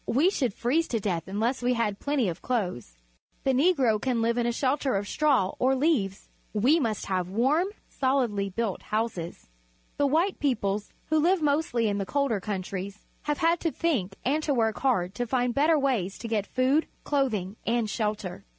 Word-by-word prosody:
We 300 Hz, +10 st, +3 dB
should 255 Hz, -, 0 dB
freeze 305 Hz, +8 st, +1 dB
to 230 Hz, -, 0 dB
death 180 Hz, -5 st, -2 dB
un 200 Hz, +2 st, -3 dB
less 245 Hz, +4 st, 0 dB
we 245 Hz, 0 st, +1 dB
had 215 Hz, -4 st, -1 dB
plenty 285 Hz, -6 st, 0 dB
of 170 Hz, 0 st, -4 dB
clothes. 180 Hz, -, -2 dB, 0.5 s
The 270 Hz, -, +2 dB
Negro 260 Hz, -7 st, +3 dB
can 255 Hz, -3 st, 0 dB
live 235 Hz, +1 st, +1 dB
in 240 Hz, -, +1 dB
a -, -, +2 dB
sheltei 265 Hz, -1 st, 0 dB
of 200 Hz, +1 st, -3 dB
straw 275 Hz, -11 st, +2 dB
or 260 Hz, +1 st, +3 dB
leaves. 255 Hz, -, 0 dB, 0.3 s
We 260 Hz, +11 st, +4 dB
must 225 Hz, -7 st, -1 dB
have 185 Hz, -2 st, -1 dB
warm, 270 Hz, -, +2 dB, 0.3 s
sohdly 245 Hz, -7 st, +1 dB
built 225 Hz, -2 st, -2 dB
houses. 210 Hz, -6 st, -3 dB, 0.5 s
The 285 Hz, -, +3 dB
white 335 Hz, +7 st, +1 dB
peoples, 210 Hz, -7 st, 0 dB, 0.2 s
who 315 Hz, -1 st, +4 dB
Uve 365 Hz, +1 st, +3 dB
mostly 285 Hz, -6 st, +1 dB
in 205 Hz, -1 st, 0 dB
the 195 Hz, -, -3 dB
colder 280 Hz, -7 st, 0 dB
countries, 195 Hz, 0 st, -5 dB, 0.2 s
have 295 Hz, -1 st, 0 dB
had 335 Hz, +1 st, +2 dB
to 330 Hz, -, 0 dB
think 230 Hz, -, -1 dB
and 290 Hz, +5 st, +2 dB
to 290 Hz, -3 st, 0 dB
work 225 Hz, -2 st, +1 dB
hard 190 Hz, -9 st, +1 dB
to 245 Hz, -, -2 dB
find 245 Hz, 0 st, +1 dB
better 305 Hz, +4 st, +4 dB
ways 245 Hz, -10 st, 0 dB
to 230 Hz, -, -6 dB
get 215 Hz, -3 st, -1 dB
food, 265 Hz, +5 st, +2 dB, 0.2 s
clothing, 220 Hz, -10 st, 0 dB
and 230 Hz, -1 st, +1 dB
shelter. 210 Hz, -4 st, -3 dB
240 Hz, 185 wpm, -27 LUFS, 205-280 Hz, 0.5 s, We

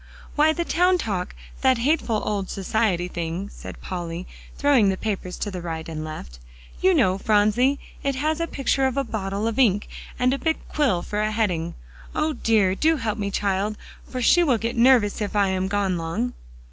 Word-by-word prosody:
"Why, 305 Hz, +1 st, +5 dB
the 340 Hz, +2 st, -2 dB
Town 360 Hz, +2 st, +3 dB
Talk 195 Hz, -, -3 dB, 0.3 s
that 260 Hz, -2 st, +4 dB
hateful 235 Hz, -4 st, +1 dB
old 200 Hz, -3 st, -2 dB
society 195 Hz, -2 st, 0 dB
thing," 175 Hz, +3 st, -4 dB
said -, -, -9 dB
Polly, 175 Hz, -1 st, -5 dB, 0.3 s
throwing 275 Hz, -8 st, +4 dB
the 190 Hz, -, 0 dB
papers 190 Hz, -4 st, -3 dB
to 205 Hz, -, -3 dB
right 165 Hz, -2 st, -5 dB
and 155 Hz, -1 st, -5 dB
left. 65 Hz, -, -8 dB, 0.4 s
"You 375 Hz, 0 st, +4 dB
know, 190 Hz, -, +3 dB
Phronsie; 215 Hz, +7 st, +3 dB, 0.2 s
it 275 Hz, -1 st, -1 dB
has 310 Hz, +4 st, 0 dB
a 335 Hz, -, -1 dB
picture 270 Hz, -2 st, +1 dB
of 265 Hz, -, -3 dB
a 275 Hz, -, +2 dB
bottle 200 Hz, -3 st, -3 dB
of 230 Hz, +2 st, -1 dB
ink, 205 Hz, -5 st, +3 dB, 0.3 s
and 255 Hz, 0 st, +2 dB
a 275 Hz, -, -2 dB
big 320 Hz, -1 st, 0 dB
quill 235 Hz, -13 st, +1 dB
for 210 Hz, 0 st, -2 dB
a 215 Hz, -, +1 dB
heading. 185 Hz, -7 st, -1 dB, 0.4 s
O 310 Hz, 0 st, +1 dB
dear! 215 Hz, -8 st, +2 dB
do 320 Hz, +11 st, +2 dB
help 225 Hz, -5 st, -2 dB
me, 200 Hz, -1 st, -1 dB
child, 200 Hz, +1 st, -1 dB, 0.3 s
for 255 Hz, -1 st, -3 dB
she 350 Hz, -, +6 dB
will 265 Hz, -8 st, +3 dB
get 230 Hz, +2 st, -3 dB
nervous 235 Hz, -4 st, +4 dB
if 210 Hz, 0 st, -3 dB
I 200 Hz, -2 st, +3 dB
am 190 Hz, 0 st, 0 dB
gone 195 Hz, -3 st, 0 dB
long." 190 Hz, +10 st, -2 dB
215 Hz, 190 wpm, -24 LUFS, 190-265 Hz, 0.4 s, she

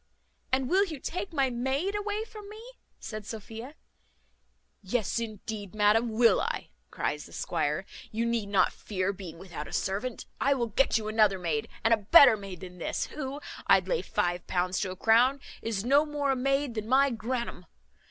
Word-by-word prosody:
"And 260 Hz, 0 st, +2 dB
will 380 Hz, +6 st, +4 dB
you 315 Hz, -7 st, -7 dB
take 360 Hz, +7 st, -4 dB
my 275 Hz, -5 st, +1 dB
maid 265 Hz, +11 st, -1 dB
away 415 Hz, +1 st, -2 dB
from 425 Hz, -2 st, -11 dB
me?" 430 Hz, +1 st, -10 dB, 0.4 s
said 215 Hz, -1 st, -6 dB
Sophia. 225 Hz, +6 st, -8 dB, 1.1 s
"Yes, 215 Hz, +2 st, -1 dB
indeed, 215 Hz, -2 st, -6 dB
madam, 215 Hz, +3 st, +4 dB
will 230 Hz, +1 st, +4 dB
I," -, -, -3 dB, 0.2 s
cries -, -, -3 dB
the -, -, -16 dB
squire: -, -, -1 dB, 0.3 s
"you 230 Hz, +2 st, -1 dB
need 230 Hz, -3 st, -1 dB
not 200 Hz, -2 st, +3 dB
fear 195 Hz, -1 st, -2 dB
being 180 Hz, -4 st, -9 dB
without 170 Hz, -4 st, -7 dB
a -, -, -10 dB
servant; 210 Hz, +6 st, -2 dB
I 280 Hz, +1 st, +3 dB
will 235 Hz, -3 st, -1 dB
get 250 Hz, +3 st, +3 dB
you 215 Hz, -1 st, -4 dB
another 215 Hz, -3 st, +3 dB
maid, 165 Hz, -5 st, -2 dB, 0.2 s
and 225 Hz, -, +5 dB
a -, -, +5 dB
better 250 Hz, +4 st, +8 dB
maid 195 Hz, -4 st, -8 dB
than 180 Hz, -1 st, -10 dB
this, -, -, -2 dB
who, 280 Hz, 0 st, -5 dB, 0.3 s
I'd -, -, +5 dB
lay -, -, +1 dB
five 175 Hz, -5 st, -1 dB
pounds 180 Hz, 0 st, 0 dB
to 195 Hz, -, -1 dB
a 185 Hz, -, -5 dB
crown, 240 Hz, +7 st, +4 dB, 0.2 s
is 220 Hz, -2 st, -2 dB
no 280 Hz, +4 st, +5 dB
more 295 Hz, -2 st, -1 dB
a -, -, +2 dB
maid 275 Hz, 0 st, 0 dB
than 215 Hz, 0 st, -4 dB
my 275 Hz, +1 st, +5 dB
grannum. 235 Hz, -5 st, -4 dB
230 Hz, 180 wpm, -29 LUFS, 200-275 Hz, 1.1 s, better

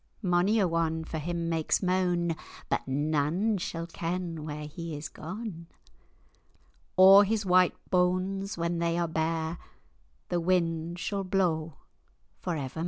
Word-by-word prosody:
Mony 180 Hz, +4 st, +3 dB
a 195 Hz, -4 st, +3 dB
one 165 Hz, -1 st, 0 dB
for 160 Hz, 0 st, -5 dB
him 170 Hz, +2 st, -3 dB
makes 165 Hz, +3 st, 0 dB
mane, 180 Hz, -2 st, +1 dB, 0.3 s
But -, -, -1 dB
nane 155 Hz, +9 st, +1 dB
sall 165 Hz, -1 st, -4 dB
ken 170 Hz, -1 st, -4 dB
where 150 Hz, 0 st, -5 dB
he 160 Hz, +1 st, -6 dB
is 145 Hz, 0 st, -6 dB
gane; 180 Hz, -1 st, -7 dB, 1.3 s
O'er 195 Hz, +2 st, +9 dB
his 215 Hz, +1 st, 0 dB
white 180 Hz, -1 st, +4 dB, 0.2 s
banes, 185 Hz, +2 st, +1 dB
when 170 Hz, 0 st, -1 dB
they 170 Hz, 0 st, 0 dB
are 170 Hz, -1 st, +1 dB
bare, 160 Hz, +1 st, -1 dB, 0.7 s
The 175 Hz, -, +1 dB
wind 170 Hz, -1 st, 0 dB
sall 195 Hz, +2 st, -2 dB
blaw 170 Hz, -4 st, 0 dB, 0.7 s
for 175 Hz, -, -2 dB
evermair." 135 Hz, +1 st, -5 dB
170 Hz, 135 wpm, -29 LUFS, 160-185 Hz, 1.3 s, O'er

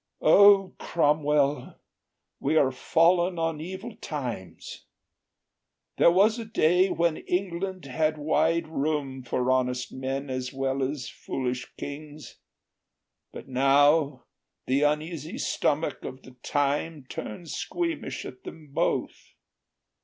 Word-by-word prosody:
"O, 200 Hz, -2 st, +6 dB
Cromwell, 150 Hz, -2 st, +1 dB, 0.6 s
we 155 Hz, +3 st, +1 dB
are 135 Hz, -3 st, +4 dB
fallen 175 Hz, +6 st, +2 dB
on 165 Hz, -2 st, -1 dB
evil 190 Hz, +7 st, -7 dB
times! 125 Hz, -, -6 dB, 1.1 s
There -, -, +6 dB
was 205 Hz, +6 st, +4 dB
a -, -, -4 dB
day 185 Hz, -3 st, +3 dB
when 170 Hz, -2 st, +1 dB
England 185 Hz, -1 st, -3 dB
had 155 Hz, +3 st, 0 dB
wide 160 Hz, +2 st, +1 dB
room 145 Hz, -3 st, -2 dB
For 125 Hz, 0 st, -1 dB
honest 125 Hz, -1 st, 0 dB
men 135 Hz, +1 st, -4 dB
as 130 Hz, -1 st, -3 dB
well 135 Hz, 0 st, -2 dB
as 135 Hz, 0 st, -2 dB
foolish 125 Hz, -1 st, -4 dB
kings; 150 Hz, +1 st, -8 dB, 0.9 s
But -, -, -10 dB
now 140 Hz, +1 st, +3 dB, 0.4 s
the 135 Hz, +2 st, +1 dB
uneasy 155 Hz, -, -1 dB
stomach 155 Hz, -, -1 dB
of 130 Hz, -, -8 dB
the 130 Hz, -, -13 dB
time 145 Hz, +1 st, -1 dB
Turns 155 Hz, +9 st, -7 dB
squeamish 340 Hz, -2 st, -3 dB
at -, -, -10 dB
them 155 Hz, -2 st, -10 dB
both. -, -, -2 dB
150 Hz, 115 wpm, -27 LUFS, 135-170 Hz, 1.1 s, O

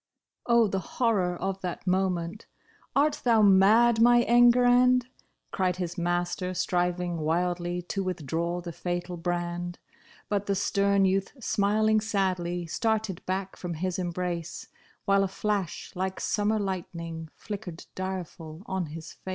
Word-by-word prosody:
Oh, 235 Hz, -1 st, +5 dB
the 195 Hz, -1 st, -1 dB
horror 190 Hz, -3 st, 0 dB
of 195 Hz, +1 st, -3 dB
that 180 Hz, -1 st, -5 dB
moment! 185 Hz, 0 st, -1 dB, 0.2 s
" -, -, -33 dB
Art 290 Hz, +2 st, +2 dB
thou 230 Hz, -3 st, +4 dB
mad 215 Hz, +4 st, +5 dB
my 240 Hz, 0 st, +6 dB
Enguerrand 245 Hz, +1 st, +5 dB
} -, -, -34 dB
" -, -, -49 dB
Cried 185 Hz, -2 st, 0 dB
his 175 Hz, -2 st, -4 dB
master, 175 Hz, +1 st, -1 dB
striving 175 Hz, -1 st, 0 dB
wildly 175 Hz, +2 st, -1 dB
to 195 Hz, +3 st, -3 dB
withdraw 170 Hz, 0 st, -2 dB
the 170 Hz, -1 st, -6 dB
fatal 175 Hz, +1 st, -4 dB
brand. 175 Hz, 0 st, -3 dB, 0.5 s
But 205 Hz, -1 st, -1 dB
the 200 Hz, -, +1 dB
stern 200 Hz, 0 st, +2 dB
youth 195 Hz, +1 st, 0 dB
smiling 215 Hz, 0 st, +2 dB
sadly, 185 Hz, -5 st, -1 dB
started 220 Hz, +1 st, -1 dB
back 190 Hz, +1 st, -2 dB
from 175 Hz, -2 st, -5 dB
his 185 Hz, +3 st, -2 dB
embrace. 175 Hz, -2 st, -4 dB, 0.4 s
While 195 Hz, 0 st, +4 dB
a -, -, +1 dB
flash 200 Hz, -2 st, -3 dB
Hke 190 Hz, +1 st, -2 dB
summer 210 Hz, +1 st, +1 dB
lightning, 170 Hz, -5 st, -4 dB
flickered 195 Hz, -6 st, -7 dB
dire 185 Hz, 0 st, -3 dB
ful 160 Hz, +1 st, -11 dB
on 190 Hz, -3 st, -2 dB
his 160 Hz, +1 st, -8 dB
face. -, -, -11 dB
185 Hz, 145 wpm, -27 LUFS, 175-205 Hz, 0.5 s, my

